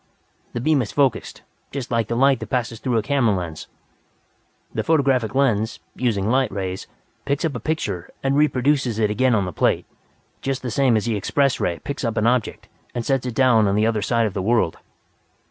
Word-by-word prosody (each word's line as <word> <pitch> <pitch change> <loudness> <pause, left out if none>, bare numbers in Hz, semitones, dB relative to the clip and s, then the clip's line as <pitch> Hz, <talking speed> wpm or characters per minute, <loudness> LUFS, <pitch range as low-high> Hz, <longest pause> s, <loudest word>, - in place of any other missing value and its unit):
"The - - -2
beam 150 +2 +2
is 110 - -4
focused, 140 -4 0 0.3
just 135 -3 -5
like 115 -2 +1
the 115 - -2
light 135 0 +4
that - - -7
passes 120 -3 -2
through 125 -2 0
a 110 - +1
camera 120 -4 +2
lens. 85 -3 -6 1.1
The - - -1
photographic 135 -7 +2
lens, 115 -5 +1 0.2
using 105 -6 0
light 130 +3 +2
rays, 95 -1 -4 0.4
picks 140 +3 -1
up 155 - -1
a - - -4
picture 155 - -3
and 135 0 +1
reproduces 135 -4 +2
it 105 -2 +1
again 125 +2 +2
on 100 -3 +1
the 90 - -5
plate - - +1 0.6
just 135 -1 -2
the 125 - -3
same 125 -1 +3
as 105 - -1
the 115 -2 0
Express 135 +6 +1
Ray 85 -1 -1
picks 140 +8 -6
up 115 -2 -1
an 110 - +2
object 120 -1 0 0.3
and 120 -1 -2
sets 135 -2 0
it 120 - -4
down 120 -5 +4
on 100 - +1
the 105 +1 +3
other 110 -2 +1
side 115 +2 +1
of 105 - -2
the 95 - -2
world. 115 -4 +1
120 Hz, 205 wpm, -22 LUFS, 105-135 Hz, 1.1 s, light